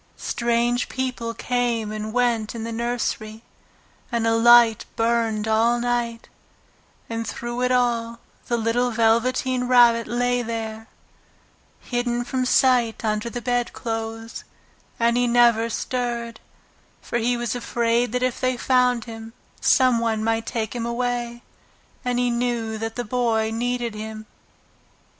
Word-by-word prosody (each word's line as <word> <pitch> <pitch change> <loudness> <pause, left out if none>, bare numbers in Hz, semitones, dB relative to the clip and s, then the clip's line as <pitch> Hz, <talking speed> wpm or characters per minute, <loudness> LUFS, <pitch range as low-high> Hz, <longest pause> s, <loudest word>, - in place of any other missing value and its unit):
Strange 240 +1 0
people 250 -3 -3
came 240 -3 -1
and 215 0 -4
went 235 -2 0
in 225 - -5
the 230 - -4
nursery, 230 -1 -3 0.7
and 235 -1 0
a 225 0 +3
light 235 -1 +6
burned 225 -2 0
all 230 +2 +3
night 240 -1 -2 0.8
and 230 0 -4
through 240 +1 -4
it 250 0 +1
all 235 -2 0 0.3
the 240 - 0
little 235 +2 +1
Velveteen 245 +3 +1
Rabbit 240 -2 +5
lay 245 +2 0
there, 225 -1 -5 0.9
hidden 240 -1 -1
from 255 +1 -2
sight 250 -3 +2
under 215 +1 -1
the 240 0 -6
bedclothes, 225 -2 -3 0.6
and 235 +1 +2
he 245 0 +2
never 235 -1 +4
stirred, 235 -1 -3 0.6
for 240 - -3
he 240 +1 +1
was 240 -2 -2
afraid 235 -1 0
that 250 +1 -1
if 255 -1 -1
they 255 -1 +1
found 250 -2 +2
him 225 -1 -9 0.3
some 255 -3 +4
one 225 -2 -1
might 225 0 0
take 220 -3 -3
him 235 - -2
away, 240 0 -2 0.6
and 245 -1 -1
he 245 0 +1
knew 235 -2 -1
that 225 0 -4
the 245 - -3
Boy 225 -1 0
needed 240 0 -2
him. 215 0 -7
235 Hz, 135 wpm, -23 LUFS, 225-245 Hz, 0.9 s, light